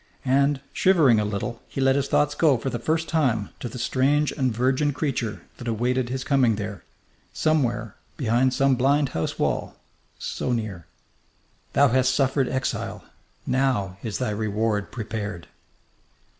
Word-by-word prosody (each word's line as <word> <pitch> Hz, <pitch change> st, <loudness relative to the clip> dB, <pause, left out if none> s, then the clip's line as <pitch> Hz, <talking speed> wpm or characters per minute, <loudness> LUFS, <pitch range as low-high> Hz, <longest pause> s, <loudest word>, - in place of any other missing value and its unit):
And, 140 Hz, +1 st, +2 dB
shivering 155 Hz, -, +4 dB
a 105 Hz, -, 0 dB
little, 105 Hz, +3 st, -4 dB
he -, -, -6 dB
let 135 Hz, 0 st, +4 dB
his 140 Hz, -1 st, 0 dB
thoughts 145 Hz, 0 st, +2 dB
go 145 Hz, -3 st, +3 dB
for 130 Hz, +3 st, -3 dB
the 120 Hz, -, -3 dB
first 160 Hz, +6 st, 0 dB
time 125 Hz, -11 st, +1 dB
to 120 Hz, -, -5 dB
the 120 Hz, -, -8 dB
strange 140 Hz, +5 st, +1 dB
and 130 Hz, -4 st, 0 dB
virgin 130 Hz, +5 st, +1 dB
creature 130 Hz, -7 st, -2 dB
that 120 Hz, -, -8 dB
awaited 120 Hz, +2 st, 0 dB
his 130 Hz, +1 st, -3 dB
coming 135 Hz, -6 st, +3 dB
there, 100 Hz, -2 st, -6 dB, 0.5 s
somewhere, 120 Hz, -8 st, 0 dB, 0.2 s
behind 125 Hz, 0 st, +2 dB
some 135 Hz, +1 st, +3 dB
blind 135 Hz, +3 st, +2 dB
house 80 Hz, -, -3 dB
wall, -, -, -1 dB, 0.4 s
so 125 Hz, -, -3 dB
near. 105 Hz, -8 st, -4 dB, 0.9 s
"Thou 140 Hz, 0 st, +5 dB
hast 130 Hz, +1 st, +2 dB
suffered 135 Hz, -1 st, +1 dB
exile. 130 Hz, 0 st, -3 dB, 0.4 s
Now 125 Hz, -8 st, 0 dB
is 110 Hz, -3 st, -3 dB
thy 125 Hz, -4 st, -1 dB
reward 105 Hz, 0 st, -1 dB
prepared." 105 Hz, -6 st, -5 dB
130 Hz, 150 wpm, -24 LUFS, 110-140 Hz, 0.9 s, Thou